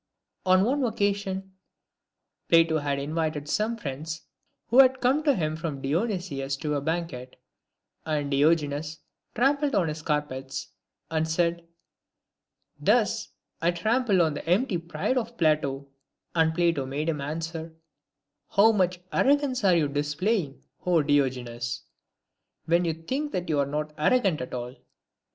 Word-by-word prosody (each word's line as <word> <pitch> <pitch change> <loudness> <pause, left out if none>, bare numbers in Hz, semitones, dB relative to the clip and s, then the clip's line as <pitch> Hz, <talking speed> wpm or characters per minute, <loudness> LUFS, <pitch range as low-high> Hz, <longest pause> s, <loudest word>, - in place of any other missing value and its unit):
On 185 +1 +5
one 270 +5 +1
occasion 200 -4 -1 1.0
Plato 165 -1 +5
had 145 -1 -1
invited 155 +1 -2
some 215 +8 0
friends 155 - -5 0.5
who 245 - +5
had 260 -1 +6
come 260 +5 +2
to 285 -3 +3
him 155 -4 -1
from 160 -4 -4
Dionysius 150 - -2
to 150 +1 -2
a 145 - 0
banquet, 155 -5 -3 0.7
and 150 -2 -2
Diogenes 150 +1 +1 0.4
trampled 280 +3 +2
on 175 -5 +2
his 155 +1 -5
carpets, 145 -3 -3 0.4
and 160 0 +1
said, 170 +1 0 0.6
" - - -50
Thus - - +2 0.3
I 165 - +3
trample 215 +1 +2
on 160 -2 +1
the 160 - -6
empty 190 0 +2
pride 170 +9 -1
of 235 0 -7
Plato 145 -4 +1 0.2
;" - - -53
and 160 -1 +3
Plato 165 -6 +1
made 145 +4 -3
him 155 -3 -1
answer, 160 +2 -5 0.4
" 145 0 -56
How 220 +3 +7
much 185 -4 +1
arrogance 275 -3 +2
are 185 -3 +5
you 160 -3 +2
displaying, 150 +3 -1 0.2
O 175 -4 +3
Diogenes! 125 -4 -1 0.8
when 170 +2 +2
you 165 -2 0
think 265 - -3
that 180 -1 -3
you 150 -2 +1
are 140 - +1
not 150 +1 -3
arrogant 190 - +2
at 125 - -5
all." 125 +1 -5
165 Hz, 145 wpm, -27 LUFS, 145-195 Hz, 1.0 s, How